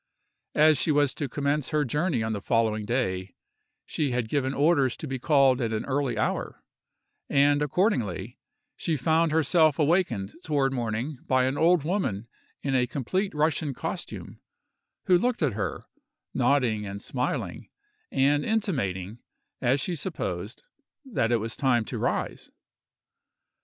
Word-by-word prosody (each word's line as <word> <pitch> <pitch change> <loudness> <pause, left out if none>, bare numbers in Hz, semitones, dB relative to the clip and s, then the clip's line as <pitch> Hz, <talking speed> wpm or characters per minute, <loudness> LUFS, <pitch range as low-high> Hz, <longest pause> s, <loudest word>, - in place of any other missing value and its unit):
As 155 -2 +5
she 160 - +2
was 145 -2 +3
to 145 -3 -4
commence 145 +1 -1
her 150 -1 +1
journey 150 -1 0
on 110 0 -1
the 100 - -4
following 110 -1 +1
day, 95 -6 -2 0.5
she 150 -3 -1
had 120 -3 -1
given 135 -1 0
orders 140 -3 +2
to - - -6
be 135 -3 -4
called 135 -2 +4
at 115 -2 -1
an 110 - -2
early 140 -2 -1
hour, - - -2 0.7
and, 145 +1 +4
accordingly, 125 - 0 0.4
she 160 -2 -1
found 160 +4 +2
herself 155 -1 +3
awakened 145 - +1
toward 140 -3 +1
morning 120 +3 -3
by 130 -1 +3
an 130 +2 0
old 165 0 +3
woman 150 - -1 0.4
in 135 - -1
a 125 -1 +2
complete 185 - -2
Russian 150 -2 0
costume, - - -6 0.6
who 180 -1 +5
looked 245 -4 0
at 135 -7 +1
her, 105 0 -3 0.5
nodding 120 -7 +2
and 100 0 -6
smiling, 125 +4 -3 0.4
and 145 +2 +3
intimating, 120 - -1 0.4
as 130 +2 +2
she 175 +6 -1
supposed, 170 - -4 0.4
that 165 - 0
it 120 - +4
was 115 +1 -4
time 120 -5 +2
to - - -5
rise. - - -2
135 Hz, 145 wpm, -27 LUFS, 120-155 Hz, 0.7 s, As